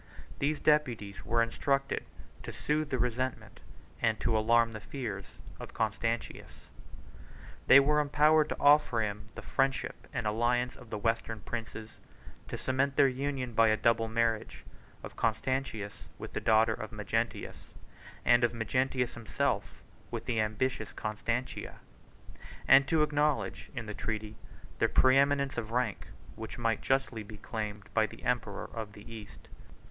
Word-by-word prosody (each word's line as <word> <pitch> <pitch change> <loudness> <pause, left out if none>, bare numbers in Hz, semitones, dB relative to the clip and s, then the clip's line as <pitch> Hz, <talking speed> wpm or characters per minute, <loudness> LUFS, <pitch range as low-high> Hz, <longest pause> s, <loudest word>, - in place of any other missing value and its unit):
These 145 +2 0
deputies 120 -10 +1
were 115 +1 +2
instructed 135 +4 0 0.4
to - - -6
soothe 150 0 -1
the 130 - 0
resentment, 125 +1 -2 0.4
and 110 -1 +2
to 115 - +1
alarm 115 +1 +4
the 110 - -6
fears, 120 +1 -6 0.2
of - - -9
Constantius. 115 +1 -3 1.0
They 135 - +10
were 150 +2 +3
empowered 150 +1 +4
to - - -4
offer 145 -5 +5
him 105 0 -3
the - - -8
friendship 135 -1 -1
and - - -3
alliance 120 +3 +1
of 125 -3 -14
the 105 - -3
western 115 0 -1
princes, 115 -1 -6 0.5
to - - -5
cement 135 +1 0
their 140 -1 +6
union 130 -1 -2
by 115 0 +5
a 110 0 +3
double 115 -1 +2
marriage; 115 -1 -1 0.4
of - - -8
Constantius 115 -2 -2
with - - -8
the - - -2
daughter 110 0 +4
of - - -6
Magnentius, - - -3 0.5
and 120 0 +5
of 120 0 +2
Magnentius 130 +2 0
himself 120 -2 -2 0.3
with - - -5
the 115 -3 +1
ambitious 110 +1 -1
Constantina; 115 +4 -3 0.9
and 135 +1 +7
to 160 -2 +3
acknowledge 150 -1 0
in 115 -3 -4
the 105 - -5
treaty 110 0 -4 0.4
the - - +4
preëminence 140 0 +3
of 110 -2 -6
rank, 115 -3 -1 0.3
which 110 0 -7
might 115 -2 0
justly 135 -4 0
be 105 0 -10
claimed 105 -2 -6
by 110 -1 +3
the - - -13
emperor 110 -5 -1
of 110 -2 -6
the 105 0 -13
East. 110 -2 -11
115 Hz, 145 wpm, -31 LUFS, 110-135 Hz, 1.0 s, They